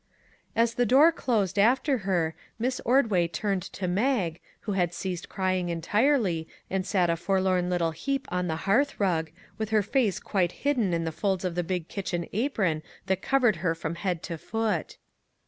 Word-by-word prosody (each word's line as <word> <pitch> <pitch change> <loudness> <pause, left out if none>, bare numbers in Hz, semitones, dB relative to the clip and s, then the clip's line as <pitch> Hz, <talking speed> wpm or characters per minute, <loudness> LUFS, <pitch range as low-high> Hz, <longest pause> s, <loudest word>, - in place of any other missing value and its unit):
As 230 0 +3
the 245 - +1
door 285 +8 +7
closed 210 - 0
after 260 +5 +3
her 165 -4 +1 0.2
Miss 250 +3 -1
Ordway 225 -9 +3
turned 195 +2 -1
to 185 - -3
Mag, 190 -4 0 0.2
who 210 - -4
had 175 -3 0
ceased 180 -2 -4
crying 185 -2 -1
entirely, 185 - +1 0.2
and 190 0 -1
sat 180 -4 +2
a - - +1
forlorn 185 0 +1
little 170 -2 +1
heap 275 - -3
on 180 0 0
the 160 - -1
hearth 260 +9 +2
rug, 165 -5 +1 0.3
with 220 -1 -2
her 215 -1 +3
face 215 -3 +1
quite 180 -4 0
hidden 245 -10 +2
in 165 -1 0
the 165 - -2
folds 190 +3 -1
of 180 - -1
the 175 +1 -1
big 175 -1 -3
kitchen 175 -4 -3
apron 200 - 0 0.2
that 190 -1 0
covered 255 -6 +3
her 165 -3 0
from 165 0 -4
head 175 -1 -2
to 165 -2 -5
foot. 225 +2 -2
190 Hz, 180 wpm, -27 LUFS, 175-225 Hz, 0.3 s, door